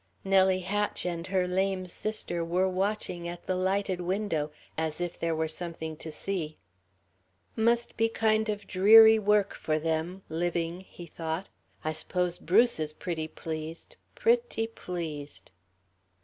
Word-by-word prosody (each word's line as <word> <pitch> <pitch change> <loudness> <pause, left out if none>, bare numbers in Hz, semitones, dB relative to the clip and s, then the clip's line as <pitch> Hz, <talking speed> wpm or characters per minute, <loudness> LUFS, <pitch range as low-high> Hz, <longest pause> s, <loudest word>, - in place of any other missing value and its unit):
Nellie 190 -1 +4
Hatch 205 +2 -1
and 170 0 -3
her 185 -1 +1
lame 190 0 0
sister 180 -2 -3
were 180 +3 +1
watching 185 -2 -2
at 175 0 -7
the 185 - 0
lighted 190 0 0
window, 175 -5 -1 0.3
as 160 0 -2
if 175 -1 -3
there 165 -1 0
were 160 0 0
something 160 -1 -5
to 160 - -7
see. 160 -2 -3 1.0
"Must 235 +1 +2
be 225 0 +3
kind 220 -1 +2
of 205 -1 -3
dreary 220 +3 +8
work 210 -1 +3
for 155 0 -1
them 165 +4 -2
living," 170 +1 -1
he 175 -2 -11
thought, 165 +2 -4 0.2
"... - - -35
I 155 - 0
s'pose 180 +2 -2
Bruce 225 +4 +3
is 155 -1 -2
pretty 160 -1 -3
pleased... 160 0 -7 0.2
pretty 470 - +2
pleased." 165 -9 -6
180 Hz, 145 wpm, -29 LUFS, 165-200 Hz, 1.0 s, dreary